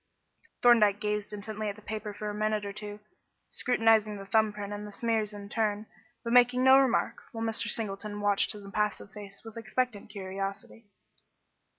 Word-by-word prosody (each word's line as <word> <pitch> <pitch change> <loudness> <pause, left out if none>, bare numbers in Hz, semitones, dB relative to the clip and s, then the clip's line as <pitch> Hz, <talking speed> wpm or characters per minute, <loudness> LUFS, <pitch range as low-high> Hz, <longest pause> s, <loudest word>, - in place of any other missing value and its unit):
Thorndyke 215 -4 +6
gazed 210 -1 -2
intently 210 +1 -4
at 200 - -5
the 215 - -15
paper 215 0 -5
for 210 +1 -6
a 210 - -3
minute 215 0 0
or 200 - -5
two, 210 0 -7 0.5
scrutinising 225 -3 +2
the 195 - -8
thumb 215 +2 +3
print 205 0 -6
and 205 0 -6
the - - -9
smears 220 -1 0
in 205 -1 -8
turn, 210 -1 -1 0.4
but 235 - -2
making 250 +1 +5
no 265 +1 +8
remark, 265 -3 +1
while 225 0 -3
Mr. 225 -1 0
Singleton 205 -1 -2
watched 205 -1 +2
his 205 -1 -10
impassive 210 0 -2
face 200 -1 -11
with 225 0 -10
expectant 230 -1 -2
curiosity. 195 +2 -6
210 Hz, 175 wpm, -29 LUFS, 205-225 Hz, 0.5 s, no